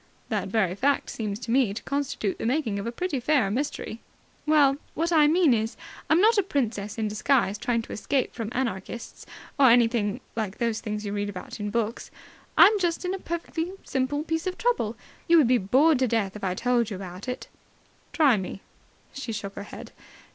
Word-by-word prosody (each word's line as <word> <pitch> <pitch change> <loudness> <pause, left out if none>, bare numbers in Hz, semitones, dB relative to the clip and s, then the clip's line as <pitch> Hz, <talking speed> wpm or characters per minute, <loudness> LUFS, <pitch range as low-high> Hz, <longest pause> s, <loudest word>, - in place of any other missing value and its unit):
"That - - -1
very 195 -6 +1
fact 275 +8 0
seems 210 -3 -3
to 235 - -4
me 240 -6 +3
to 225 - -6
constitute 275 -8 -2
the - - -3
makings 240 -6 0
of 200 - -4
a - - -2
pretty 295 +2 -2
fair 250 -6 +2
mystery." 240 -2 -3 0.5
"Well, 285 -3 +5 0.2
what 335 +2 0
I 305 -3 +6
mean 325 -3 +4
is, 225 +1 -1 0.3
I'm 320 - +5
not 435 +2 +5
a - - +5
princess 230 - -2
in 220 -1 0
disguise 210 -1 +1
trying 230 0 0
to - - -8
escape 265 +4 -1
from 225 -3 -4
anarchists, 235 -2 -4 0.3
or 270 -2 +7
anything 230 -3 +3 0.2
like 215 -3 -3
those 230 -2 -1
things 210 -2 -4
you 200 - -3
read 205 0 -2
about 190 +1 -8
in 205 0 -3
books. 230 +1 -2 0.5
I'm 420 0 +7
just 345 -1 -1
in 365 - -1
a 385 - -4
perfectly 340 +1 -4
simple 275 +3 -1
piece 325 +2 -2
of 370 - -3
trouble. 455 - 0 0.3
You 335 - +6
would 300 -7 +5
be 250 0 +4
bored 265 +9 +4
to 260 - +2
death 210 -4 0
if 210 - -9
I 185 -1 0
told 240 0 +1
you 205 - -4
about 185 +2 -8
it." 250 - -4 0.6
"Try 285 -8 +4
me." 190 0 -5 0.5
She 270 -4 -5
shook 200 -2 -5
her 200 - -7
head. - - -9
240 Hz, 200 wpm, -26 LUFS, 210-295 Hz, 0.6 s, or